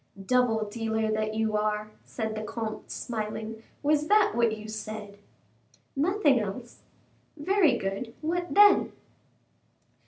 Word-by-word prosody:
"Double 240 -2 +2
dealer 220 0 -1
that 215 0 -1
you 220 -1 0
are," 210 0 -1
said 220 -2 -4
the 215 - -4
comte, 220 0 -5
smiling; 220 -1 -5 0.2
"was 300 +1 +2
that 420 +1 +5
what 230 -2 +2
you 215 0 -9
said?" 215 -1 -7 0.8
"Nothing 300 - +3
else." 220 +4 -6 0.6
"Very 325 -4 +3
good; 195 +4 -4
what 350 +3 -2
then?" 410 0 +6
220 Hz, 120 wpm, -28 LUFS, 215-290 Hz, 0.8 s, then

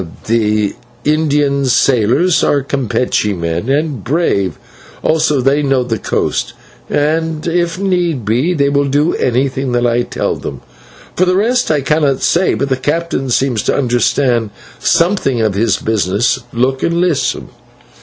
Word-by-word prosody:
"The 105 -2 +1 0.3
Indian 145 -2 +1
sailors 130 - +2
are 145 -2 +2
Campeche 125 -6 -1
men 85 +6 -3
and 145 -5 -1
brave, 120 - 0 0.5
also 155 -3 +2
they 135 +3 +2
know 135 -3 +1
the 115 -4 -3
coast, - - -2 0.4
and 160 +1 -1
if 170 0 0
need 175 - -1
be 125 +12 +1
they 140 -3 +2
will 140 0 +1
do 145 +4 +1
anything 130 +1 -1
that 120 0 +1
I 120 0 +2
tell - - -2
them. - - -7 0.5
For 185 - +2
the 180 0 +2
rest 240 +5 +1
I 150 -2 +1
cannot 145 -1 +1
say, 180 +2 +2
but 140 - -2
the 130 - +1
captain 150 0 -2
seems 125 -3 +1
to - - 0
understand 120 -2 +1 0.3
something 170 - +1
of 110 -2 +1
his 110 +4 +1
business. 105 +1 0
Look 130 +3 0
and 170 - 0
listen!" 175 -5 0
135 Hz, 145 wpm, -15 LUFS, 120-160 Hz, 0.5 s, sailors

